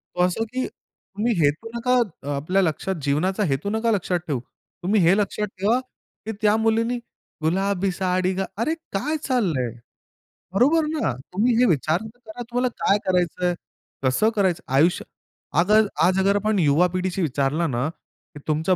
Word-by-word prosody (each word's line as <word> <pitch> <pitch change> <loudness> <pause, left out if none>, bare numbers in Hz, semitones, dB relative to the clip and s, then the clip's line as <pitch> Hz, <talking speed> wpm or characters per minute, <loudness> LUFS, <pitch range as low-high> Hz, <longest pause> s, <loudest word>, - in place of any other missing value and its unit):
तो 180 - 0
असा 180 +5 +1
की 255 0 -1
तुम्ही 220 +4 -5
हेतू 150 +10 0
नका. 245 +2 +1 0.3
अ, - - -9
आपल्या 180 +8 +1
लक्षात 185 +2 -1
जीवनाचा 180 +9 +1
हेतू 135 +9 -1
नका 220 +2 +1
लक्षात 185 -3 0
ठेऊ. 140 -6 -1 0.4
तुम्ही 200 +3 +3
हे 175 +2 +5
लक्षात 210 0 -1
ठेवा 215 +6 +3 0.5
की 220 - -2
त्या 210 0 +4
मुलीने 225 +2 +1 0.5
गुलाबी 195 +3 +1
साडी 185 0 0
गा 190 +1 -1 0.2
अरे! 310 +7 +1 0.2
काय 290 +11 -1
चाललंय? 175 - +1 0.8
बरोबर 295 +10 +4
ना. 305 - 0 0.2
तुम्ही 230 +6 +2
हे 250 - +5
विचार 155 +1 +1
तर 220 +2 -11
करा 220 +3 -8
तुम्हाला 245 +1 +1 0.2
काय 200 - +5
करायचंय? 180 -1 +1 0.5
कसं 130 +12 +3
करायचं? 190 -5 +1
आयुष्य 160 +6 +3 0.5
अगर 210 +4 +4 0.2
आज 185 +2 +3
अगर 195 +1 +3
आपण 210 0 +1
युवा 155 +3 +4
पिढीशी 185 +1 -1
विचारलं 145 +1 0
ना 125 +3 0
की 155 -2 -17
तुमच्या 160 +4 +2
190 Hz, 160 wpm, -23 LUFS, 170-220 Hz, 0.8 s, हे